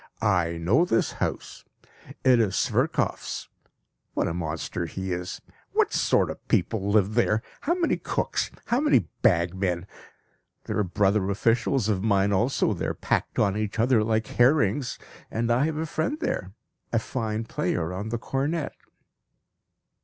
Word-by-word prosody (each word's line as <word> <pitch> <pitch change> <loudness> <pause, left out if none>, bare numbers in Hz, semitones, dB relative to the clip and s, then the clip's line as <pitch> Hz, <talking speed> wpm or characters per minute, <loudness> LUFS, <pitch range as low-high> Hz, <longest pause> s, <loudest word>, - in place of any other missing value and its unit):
I 90 -5 +2
know 95 - +3
this 115 -10 +1
house; - - -4 0.6
it 130 -2 +5
is 100 -4 +1
Sverkoff's. - - 0 0.7
What - - +1
a 85 - -2
monster 85 +1 -3
he 95 +1 -4
is! 90 +1 -5 0.3
What - - +2
sort - - +2
of - - -12
people 100 +2 +1
live 105 0 +3
there! 110 -2 +2 0.2
How 340 +4 0
many 350 -2 +1
cooks, - - -1 0.2
how 240 - +1
many 295 0 +3
bagmen! 90 0 +1 0.8
There - - -2
are - - +3
brother 100 +1 +1
officials 115 +3 +1
of 100 -4 +1
mine 100 -2 +3
also 115 +7 +2
there - - -3
packed - - -1
on 100 -2 +2
each 105 0 -2
other 115 -1 +3
like 110 0 +1
herrings. 120 -1 +2 0.3
And 115 +1 -1
I 125 +4 +3
have 155 -1 -2
a 160 - -1
friend 160 - -2
there, 95 - -2 0.4
a 115 - +2
fine 110 -1 -2
player 90 -5 -2
on 100 +4 -4
the 120 - -1
cornet." 140 +6 -2
110 Hz, 150 wpm, -26 LUFS, 95-120 Hz, 0.8 s, it